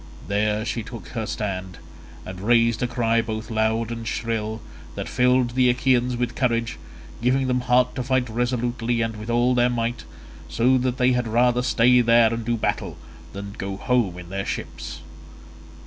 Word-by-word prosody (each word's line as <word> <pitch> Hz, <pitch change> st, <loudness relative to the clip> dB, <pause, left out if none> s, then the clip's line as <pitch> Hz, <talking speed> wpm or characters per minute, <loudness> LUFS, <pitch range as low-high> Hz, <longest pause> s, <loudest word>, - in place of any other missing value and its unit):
There 105 Hz, +1 st, 0 dB
she 115 Hz, +1 st, -2 dB
took 110 Hz, -4 st, -9 dB
her 110 Hz, -3 st, -4 dB
stand, 95 Hz, -3 st, -4 dB, 0.5 s
and 95 Hz, 0 st, -8 dB
raised 115 Hz, +1 st, +3 dB
a 125 Hz, -, +1 dB
cry 115 Hz, -2 st, +1 dB
both 110 Hz, 0 st, -5 dB
loud 110 Hz, +1 st, 0 dB
and 115 Hz, -1 st, -5 dB
shrill 110 Hz, -2 st, -2 dB, 0.4 s
that -, -, -4 dB
filled 125 Hz, 0 st, +2 dB
the 125 Hz, 0 st, +3 dB
Achaeans 125 Hz, -1 st, +2 dB
with 120 Hz, -1 st, -1 dB
courage, 115 Hz, -3 st, -1 dB, 0.4 s
giving 130 Hz, +3 st, +2 dB
them 125 Hz, -1 st, 0 dB
heart 125 Hz, 0 st, +2 dB
to 130 Hz, -, -3 dB
fight 130 Hz, 0 st, 0 dB
resolutely 120 Hz, 0 st, -1 dB
and 115 Hz, -1 st, -3 dB
with 110 Hz, +2 st, -8 dB
all 120 Hz, +2 st, +3 dB
their 125 Hz, 0 st, +3 dB
might, 120 Hz, 0 st, -2 dB, 0.4 s
so 125 Hz, +2 st, +3 dB
that 125 Hz, 0 st, -1 dB
they 125 Hz, 0 st, +3 dB
had 125 Hz, -1 st, 0 dB
rather 120 Hz, +2 st, +3 dB
stay 125 Hz, 0 st, +4 dB
there 115 Hz, -1 st, +4 dB
and 115 Hz, 0 st, -3 dB
do 120 Hz, +1 st, -1 dB
battle -, -, -2 dB, 0.4 s
than 100 Hz, 0 st, -7 dB
go 95 Hz, 0 st, -4 dB
home 115 Hz, -6 st, 0 dB
in 90 Hz, -1 st, -10 dB
their 100 Hz, +1 st, -3 dB
ships. -, -, -6 dB
115 Hz, 175 wpm, -23 LUFS, 110-125 Hz, 0.5 s, stay